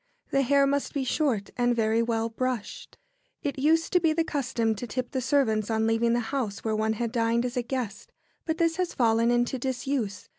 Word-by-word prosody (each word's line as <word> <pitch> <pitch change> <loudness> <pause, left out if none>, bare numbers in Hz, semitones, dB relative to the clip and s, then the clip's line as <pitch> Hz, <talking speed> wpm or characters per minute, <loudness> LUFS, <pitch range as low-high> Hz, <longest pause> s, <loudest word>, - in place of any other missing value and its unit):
The 275 - +3
hair 280 +1 +4
must 280 +2 -1
be 280 - 0
short 255 -6 0
and 245 0 +3
very 225 0 +2
well 230 -1 0
brushed. 240 -1 -4 0.5
It 280 -1 -2
used 325 +5 +2
to 360 - +6
be 325 -3 +2
the 330 +1 +1
custom 245 -7 -1
to 245 - -5
tip 250 +2 -4
the 260 - -1
servants 230 -6 +1
on 220 0 +1
leaving 225 +1 +2
the 240 - +2
house 240 -8 -2
where 220 -1 0
one 220 +1 +1
had 230 +1 -2
dined 230 0 +1
as 250 +1 -3
a 250 - +1
guest, 240 -4 -5 0.3
but 320 -1 -2
this 330 0 +1
has 365 -1 -2
fallen 230 -1 +3
into 240 +2 +1
disuse. 250 -5 -2
245 Hz, 210 wpm, -27 LUFS, 225-275 Hz, 0.5 s, to